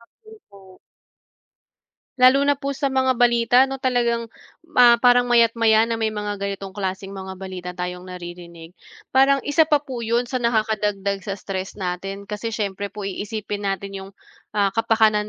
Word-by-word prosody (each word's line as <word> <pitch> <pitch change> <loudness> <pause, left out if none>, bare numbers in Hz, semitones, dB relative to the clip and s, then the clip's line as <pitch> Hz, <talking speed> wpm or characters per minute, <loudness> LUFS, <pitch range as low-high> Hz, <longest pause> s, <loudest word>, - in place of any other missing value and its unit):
Nak 235 - -24
din 440 0 -15
po. 190 -2 -17 1.4
Lalo 255 +2 +6
na 285 -1 +3
po 280 0 -3
sa 275 0 -1
mga 260 -1 +2
balita 240 0 +4
na 270 - -4
talagang, 240 -3 0 0.5
ah, 240 -1 +8
parang 245 0 +5
maya't-maya 230 -2 +4
na 230 -1 -3
may 220 - +1
mga 210 -1 -4
ganitong 195 -1 -4
klaseng 195 0 -4
mga 190 -1 -7
balita 185 -1 -7
tayong 180 0 -5
naririnig 175 -2 -10 0.4
parang, 270 +1 +4
isa 305 +2 +3
pa 300 - +5
po 260 -4 -6
yun 235 +2 +1
sa 255 -1 -2
nakaka-dagdag 210 -4 0
sa 195 - -3
stress 190 -1 -6
natin, 195 +1 -5
kasi 210 +3 -5
syempre 200 -1 -3
po 205 0 -8
i-isipin 205 +1 -4
natin 195 +1 -4
yung, 190 0 -10 0.5
ah, 200 -1 +2
ka-pakanan 220 -2 +2
210 Hz, 160 wpm, -22 LUFS, 195-240 Hz, 1.4 s, ah